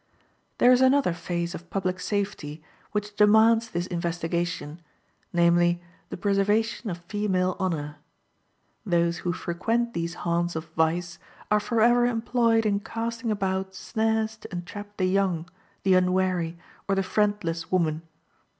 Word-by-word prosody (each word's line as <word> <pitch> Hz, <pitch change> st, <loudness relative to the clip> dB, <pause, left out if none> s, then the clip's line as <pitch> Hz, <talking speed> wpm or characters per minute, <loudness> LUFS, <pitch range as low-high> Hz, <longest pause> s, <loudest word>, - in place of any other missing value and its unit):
There 245 Hz, -, +6 dB
is 250 Hz, 0 st, +5 dB
another 260 Hz, -6 st, +4 dB
phase 170 Hz, 0 st, -3 dB
of 175 Hz, 0 st, -9 dB
public 185 Hz, -2 st, -2 dB
safety 180 Hz, -8 st, -3 dB, 0.3 s
which 210 Hz, 0 st, -3 dB
demands 220 Hz, +2 st, +5 dB
this 175 Hz, -3 st, -2 dB
investigation, 170 Hz, -2 st, -3 dB, 0.5 s
namely, 175 Hz, 0 st, +3 dB, 0.3 s
the -, -, -6 dB
preservation 205 Hz, +3 st, +1 dB
of 175 Hz, -1 st, -6 dB
female 185 Hz, -2 st, 0 dB
honor. 155 Hz, -6 st, -2 dB, 0.9 s
Those 170 Hz, -3 st, +1 dB
who 175 Hz, -, -1 dB
frequent 225 Hz, +7 st, -1 dB
these 170 Hz, 0 st, -3 dB
haunts 175 Hz, 0 st, -1 dB
of 160 Hz, 0 st, -3 dB
vice 170 Hz, +2 st, 0 dB, 0.3 s
are 210 Hz, -, +5 dB
forever 240 Hz, +2 st, +3 dB
employed 230 Hz, -1 st, +2 dB
in 200 Hz, -1 st, +2 dB
casting 230 Hz, +2 st, -4 dB
about 190 Hz, -2 st, -1 dB
snares 220 Hz, +1 st, -1 dB
to 215 Hz, -, -12 dB
entrap 205 Hz, +4 st, -7 dB
the 185 Hz, -, +1 dB
young, 185 Hz, -3 st, +1 dB, 0.4 s
the 190 Hz, -, +4 dB
unwary, 180 Hz, -2 st, +1 dB, 0.3 s
or 195 Hz, -, +2 dB
the 195 Hz, -, +1 dB
friendless 190 Hz, -5 st, -1 dB
woman. 165 Hz, -4 st, +1 dB
190 Hz, 130 wpm, -26 LUFS, 170-215 Hz, 0.9 s, There